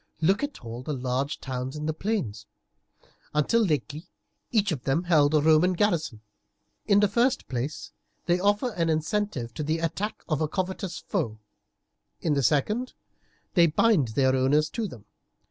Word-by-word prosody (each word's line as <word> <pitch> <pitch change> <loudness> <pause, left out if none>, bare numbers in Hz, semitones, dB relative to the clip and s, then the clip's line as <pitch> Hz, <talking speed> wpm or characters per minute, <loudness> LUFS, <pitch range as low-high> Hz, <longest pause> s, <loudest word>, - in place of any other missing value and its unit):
Look 190 +6 +2
at 285 - -5
all 115 +2 -6
the 145 +3 -3
large 130 +3 -2
towns 130 +1 -4
in 150 0 -4
the 155 - 0
plains; 145 - -3 0.9
until 190 +10 +3
lately 155 -2 -2 0.4
each 205 -4 +2
of 145 -6 -3
them 145 +6 +1
held 155 -4 +4
a 150 - +4
Roman 160 +4 +4
garrison. 170 - 0 0.7
In 200 0 +5
the 205 - +5
first 240 +6 +1
place, 130 +4 -4 0.3
they 175 0 +2
offer 205 +6 +1
an 165 -5 -1
incentive 155 - -1
to 155 - -5
the 155 +2 0
attack 190 +6 -3
of 155 -2 -1
a 155 - +2
covetous 185 +1 -3
foe; 145 - -3 0.8
in 155 - 0
the 140 - +1
second, 210 - +1 0.6
they 170 -2 +6
bind 165 - +3
their 130 -1 +3
owners 145 +4 +2
to 225 -2 -2
them. 115 - -12
155 Hz, 165 wpm, -26 LUFS, 140-200 Hz, 0.9 s, they